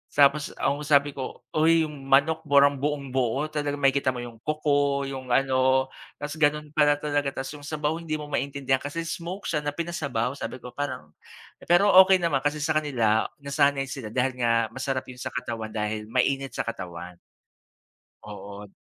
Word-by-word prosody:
Tapos 140 Hz, +1 st, +4 dB
ang 140 Hz, +1 st, 0 dB
sabi 145 Hz, -1 st, +4 dB
ko, 130 Hz, -2 st, -7 dB
"Uy, 160 Hz, +1 st, +4 dB
'yung 145 Hz, -3 st, -7 dB
manok 155 Hz, +4 st, +4 dB
parang 140 Hz, -1 st, +5 dB
buong-buo." 140 Hz, 0 st, -1 dB
Talagang 145 Hz, -1 st, -2 dB
makikita 135 Hz, -2 st, +2 dB
mo 120 Hz, -, -5 dB
'yung 115 Hz, -2 st, -10 dB
kuko, 145 Hz, -1 st, +1 dB
'yung 135 Hz, -1 st, -6 dB
ano, 130 Hz, +1 st, +2 dB, 0.2 s
tapos 145 Hz, +1 st, -6 dB
gano'n 150 Hz, 0 st, +1 dB
pala 150 Hz, -1 st, +4 dB
talaga. 145 Hz, -1 st, -2 dB
Tas 135 Hz, -, -7 dB
'yung 145 Hz, -1 st, -10 dB
sabaw, 155 Hz, +1 st, -2 dB
hindi 160 Hz, -2 st, -3 dB
mo 150 Hz, -1 st, -7 dB
maintindihan 135 Hz, -1 st, 0 dB
kasi 145 Hz, +4 st, -4 dB
smoke 175 Hz, +4 st, -5 dB
siya 155 Hz, -, -1 dB
na 145 Hz, 0 st, -4 dB
pinasabaw. 145 Hz, -8 st, -2 dB
Sabi 130 Hz, -, -6 dB
ko, 125 Hz, -, -8 dB
parang 130 Hz, -, -5 dB, 0.6 s
pero 195 Hz, +4 st, +5 dB, 0.2 s
okey 190 Hz, -, +6 dB
naman, 155 Hz, -5 st, +2 dB
kasi 145 Hz, +2 st, -1 dB
sa 155 Hz, 0 st, +2 dB
kanila 115 Hz, -7 st, +1 dB, 0.2 s
nasanay 140 Hz, 0 st, +2 dB
sila 130 Hz, -6 st, -6 dB
dahil 125 Hz, +3 st, -1 dB
nga 115 Hz, -2 st, +2 dB
masarap 135 Hz, +1 st, -2 dB
'yun 125 Hz, -1 st, -12 dB
sa 130 Hz, -1 st, -6 dB
katawan, 115 Hz, -3 st, -4 dB
dahil 105 Hz, 0 st, -2 dB
mainit 135 Hz, +3 st, 0 dB
sa -, -, -1 dB
katawan. 90 Hz, -5 st, -7 dB, 1.1 s
Oo. 105 Hz, 0 st, -9 dB
140 Hz, 170 wpm, -26 LUFS, 130-150 Hz, 1.1 s, okey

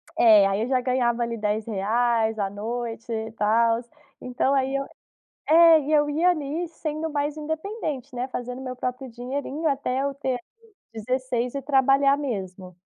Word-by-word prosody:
É, 215 Hz, -4 st, +6 dB
aí 195 Hz, +1 st, 0 dB
eu 230 Hz, -, -1 dB
já 260 Hz, -1 st, +2 dB
ganhava 245 Hz, -2 st, +1 dB
ali 235 Hz, 0 st, -3 dB
R$10,00 220 Hz, +2 st, 0 dB
a 200 Hz, -1 st, 0 dB
noite 230 Hz, +3 st, -5 dB
e 225 Hz, 0 st, -3 dB
tals, 230 Hz, +2 st, +2 dB, 0.3 s
então 255 Hz, +2 st, 0 dB
aí 270 Hz, 0 st, +1 dB
eu 275 Hz, 0 st, -1 dB, 0.6 s
é, 330 Hz, 0 st, +7 dB
e 295 Hz, +1 st, -3 dB
eu 295 Hz, -1 st, +4 dB
ia 325 Hz, +5 st, +3 dB
ali 320 Hz, +1 st, -2 dB
sendo 315 Hz, 0 st, -4 dB
mais 290 Hz, 0 st, -2 dB
independente, 315 Hz, -, -4 dB
né, 250 Hz, +1 st, -3 dB
fazendo 250 Hz, 0 st, -5 dB
meu 255 Hz, -1 st, -6 dB
próprio 255 Hz, +1 st, -4 dB
dinheirinho 270 Hz, +6 st, -4 dB
até 270 Hz, -2 st, -1 dB
eu 280 Hz, 0 st, -2 dB
ter, 275 Hz, -1 st, -3 dB
ali, -, -, -3 dB, 0.6 s
16 245 Hz, +2 st, -2 dB
e 280 Hz, -, -3 dB
trabalhar 275 Hz, 0 st, +3 dB
mesmo. 190 Hz, -9 st, -5 dB
255 Hz, 165 wpm, -24 LUFS, 230-285 Hz, 0.6 s, é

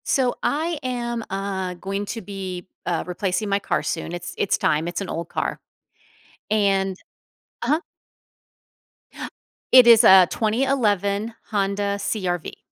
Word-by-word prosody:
So, 255 Hz, -3 st, +1 dB
I 320 Hz, +1 st, 0 dB
am, 240 Hz, -2 st, -3 dB
uh, 190 Hz, -2 st, -3 dB
going 195 Hz, +3 st, -4 dB
to 225 Hz, -, -5 dB
be, 190 Hz, -3 st, -6 dB, 0.2 s
uh, 170 Hz, -2 st, -1 dB
replacing 185 Hz, +3 st, -2 dB
my 200 Hz, 0 st, +2 dB
car -, -, -1 dB
soon. 165 Hz, 0 st, -3 dB
It's 175 Hz, 0 st, -6 dB
it's -, -, +1 dB
time, 155 Hz, +2 st, +1 dB
it's 175 Hz, -, -3 dB
an 195 Hz, -, -5 dB
old 170 Hz, +1 st, -4 dB
car, -, -, -2 dB, 0.9 s
and 195 Hz, -2 st, +1 dB, 0.7 s
uh-huh. 290 Hz, +6 st, +2 dB, 1.9 s
It 255 Hz, -2 st, +9 dB
is 230 Hz, 0 st, +8 dB
a 190 Hz, -4 st, +8 dB
2011 220 Hz, -3 st, 0 dB, 0.2 s
Honda 200 Hz, 0 st, 0 dB
CR-V. 185 Hz, -5 st, -3 dB
200 Hz, 125 wpm, -23 LUFS, 185-230 Hz, 1.9 s, It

